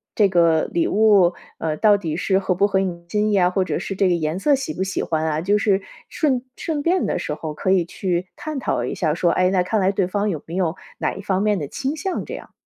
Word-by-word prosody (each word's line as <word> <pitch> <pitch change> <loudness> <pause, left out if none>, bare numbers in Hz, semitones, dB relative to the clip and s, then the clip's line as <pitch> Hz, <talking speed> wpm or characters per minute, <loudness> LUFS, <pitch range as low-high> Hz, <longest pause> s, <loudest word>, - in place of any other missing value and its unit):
这 205 -3 +4
个 170 -3 +3
礼 170 - +1
物， 200 -4 +4 0.2
呃， 155 -1 -2
到 205 +4 +4
底 160 -6 -3
是 190 +3 +1
合 190 -1 0
不 200 +3 +2
合 195 -2 +1
你 175 -3 -3
心 210 +1 +1
意 - - +1
呀？” 180 -3 +4
或 190 0 +1
者 - - -2
是 195 - -5
“这 195 - +3
个 180 - +3
颜 160 +1 -2
色 290 +8 +3
喜 275 +4 -4
不 - - -2
喜 190 - -2
欢 160 -1 -1
啊？” 155 -1 0
就 200 +4 +2
是 200 -1 +2 0.3
顺 265 -6 0
顺 310 -3 -3
便 360 +3 +2
的 - - -1
时 175 -4 -3
候 155 0 -5
可 185 - 0
以 190 -2 +4
去 180 +1 -2
探 310 -3 -5
讨 - - -1
一 - - -3
下 155 -5 0
说， 175 0 +2
哎， 185 0 +2
那 185 -2 +2
看 205 +3 0
来 190 +1 +3
对 195 -1 0
方 205 +2 -1
有 155 -6 -4
没 165 - -7
有 180 -3 0 0.2
哪 - - -1
一 195 - -7
方 195 -1 0
面 210 -1 +2
的 150 -5 -4
倾 275 - -3
向 375 +5 -3
这 - - -7
样。 - - -11
190 Hz, 290 characters per minute, -22 LUFS, 170-210 Hz, 0.3 s, 这